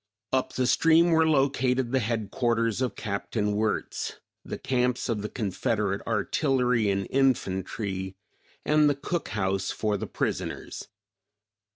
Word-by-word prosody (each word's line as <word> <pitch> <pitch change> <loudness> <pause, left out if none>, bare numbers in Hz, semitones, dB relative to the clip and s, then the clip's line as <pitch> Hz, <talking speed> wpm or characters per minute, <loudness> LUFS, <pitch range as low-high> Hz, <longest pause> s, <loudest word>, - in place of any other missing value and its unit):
Up 130 -1 +1
the 130 - 0
stream 165 +6 +4
were 160 0 +4
located 130 -3 +2
the 130 - +3
headquarters 115 0 0
of 130 - -1
Capt. 100 0 -5
Wirtz, 105 0 -1 0.3
the - - -5
camps 125 -1 0
of 110 -3 0
the 105 - -4
Confederate 105 -1 -1
artillery 125 +1 +1
and 100 0 0
infantry 95 -6 0 0.5
and 150 0 +4
the 145 - +1
cook 165 +5 -3
house 95 -2 -1
for 105 -2 -1
the - - -5
prisoners. - - -3
115 Hz, 130 wpm, -27 LUFS, 105-135 Hz, 0.5 s, stream